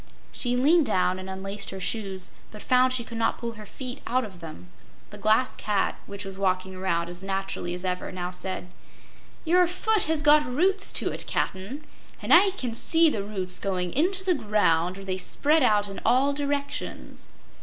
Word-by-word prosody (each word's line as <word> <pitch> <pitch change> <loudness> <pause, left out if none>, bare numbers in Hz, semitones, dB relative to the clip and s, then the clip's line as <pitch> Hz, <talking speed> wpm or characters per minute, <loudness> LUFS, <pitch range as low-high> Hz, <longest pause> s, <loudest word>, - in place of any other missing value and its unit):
She 245 -1 0
leaned 305 +4 +4
down 185 0 +1
and 185 0 -7
unlaced 195 +1 -4
her 190 - -6
shoes, 190 -1 -3 0.2
but 210 - -11
found 255 0 +4
she 255 -2 -1
could 230 0 -7
not 225 - +1
pull 235 -1 -4
her 215 -2 -11
feet 255 +4 -7
out 255 +1 +1
of 190 -4 -11
them. 165 +1 -10 0.4
The 210 - -10
Glass 220 +5 +2
Cat, 205 -2 0
which 200 0 -7
was 195 0 -7
walking 185 -1 0
around 175 -2 -1
as 175 +2 -8
naturally 195 -2 -3
as 180 +1 -6
ever, 180 0 -3
now 180 -1 -4
said: 185 0 -3 0.8
"Your 355 +2 +4
foot 410 +4 +1
has 315 -1 0
got 295 0 +6
roots 370 +10 +2
to - - +1
it, - - -8
Cap'n, 205 +11 -3 0.4
and - - +1
I 390 +3 +7
can 255 -11 -4
see 325 +6 +4
the 205 - -2
roots 190 -3 -2
going 180 -3 -2
into 370 +6 0
the 370 - +4
ground, 205 - +1
where 195 - -9
they 185 -1 -2
spread 305 +10 +2
out 210 -5 +3
in 195 - -8
all 275 +3 +3
directions. 285 0 -4
210 Hz, 190 wpm, -26 LUFS, 190-280 Hz, 0.8 s, I